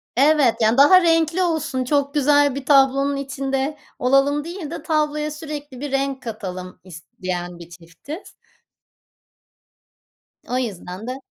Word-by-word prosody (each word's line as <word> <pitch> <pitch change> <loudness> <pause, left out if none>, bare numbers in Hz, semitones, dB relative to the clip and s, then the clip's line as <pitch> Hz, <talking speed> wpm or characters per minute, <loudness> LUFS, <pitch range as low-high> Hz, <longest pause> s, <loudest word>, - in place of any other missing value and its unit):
Evet, 280 -2 +4
yani 220 +2 +3
daha 330 +7 +7
renkli 330 +1 +2
olsun 315 -6 -1
çok 280 +1 0
güzel 290 -1 +3
bir 275 -1 -6
tablonun 275 0 +4
içinde 275 +1 -3 0.2
olalım 275 +3 +2
değil 335 -2 -7
de 335 -3 -6
tabloya 300 -1 0
sürekli 295 -3 -8
bir 285 0 -5
renk 275 0 -1
katalım 185 -6 -7
isteyen 180 -1 -6
bir 170 -1 -11
çiftiz. 175 - -11 2.1
O 250 - -2
yüzden 200 -3 -5
de 255 +1 -5
275 Hz, 125 wpm, -21 LUFS, 240-300 Hz, 2.1 s, daha